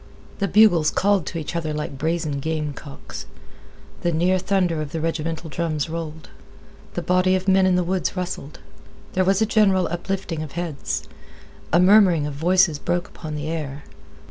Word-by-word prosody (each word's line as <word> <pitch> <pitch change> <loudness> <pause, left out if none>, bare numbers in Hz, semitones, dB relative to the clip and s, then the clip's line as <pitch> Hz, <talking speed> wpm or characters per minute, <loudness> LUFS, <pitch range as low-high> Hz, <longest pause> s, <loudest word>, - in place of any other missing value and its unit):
The 200 - +1
bugles 180 -5 +5
called 200 -5 +1
to - - -4
each 160 +1 -5
other 155 -3 -2
like 150 -3 -5
brazen 160 -2 -1
gamecocks. 150 -2 -5 0.7
The 175 - +1
near 180 +3 +2
thunder 180 -4 0
of 145 -2 -6
the 165 - -2
regimental 165 0 -2
drums 160 -1 -2
rolled. 160 -1 -6 0.7
The - - -2
body 185 +1 +3
of 185 +1 -3
men 190 0 +5
in 185 - +3
the 180 - +2
woods 185 +2 -1
rustled. 175 -4 -5 0.5
There 185 - +2
was 195 +3 +3
a - - +3
general 200 -4 +3
uplifting 175 -1 -3
of 155 -3 -7
heads. 170 -4 -3 0.7
A 170 - +5
murmuring 185 -5 +5
of 150 - -4
voices 170 +1 +3
broke 175 +3 -2
upon 155 -2 -7
the 150 0 -4
air. 150 -3 -4
170 Hz, 170 wpm, -23 LUFS, 155-185 Hz, 0.7 s, bugles